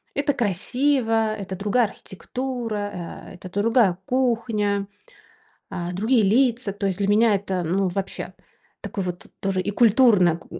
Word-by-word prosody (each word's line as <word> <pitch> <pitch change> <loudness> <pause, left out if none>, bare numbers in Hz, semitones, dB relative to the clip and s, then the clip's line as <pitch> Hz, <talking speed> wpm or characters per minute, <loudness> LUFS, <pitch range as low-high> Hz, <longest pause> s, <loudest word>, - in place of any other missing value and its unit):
это 285 0 +1
красиво, 225 +1 +1
это 195 -2 -6
другая 210 +5 +2
архитектура, 245 +4 -5 0.6
э, - - -10
это 180 +1 -10
другая 205 -2 +2
кухня, 225 -5 0 0.8
э, 175 0 -4
другие 220 +5 +2
лица. 230 +1 +2
То 200 0 -3
есть 190 -2 -1
для 200 0 0
меня 215 +1 +4
это, 190 -2 -2
ну 185 +3 0
вообще, 195 +2 -4 0.5
такое 195 -4 -4
вот 175 -1 -5
тоже 195 -1 0
и 205 - -2
культурно 210 -7 +4
к - - -18
205 Hz, 140 wpm, -23 LUFS, 190-235 Hz, 0.8 s, меня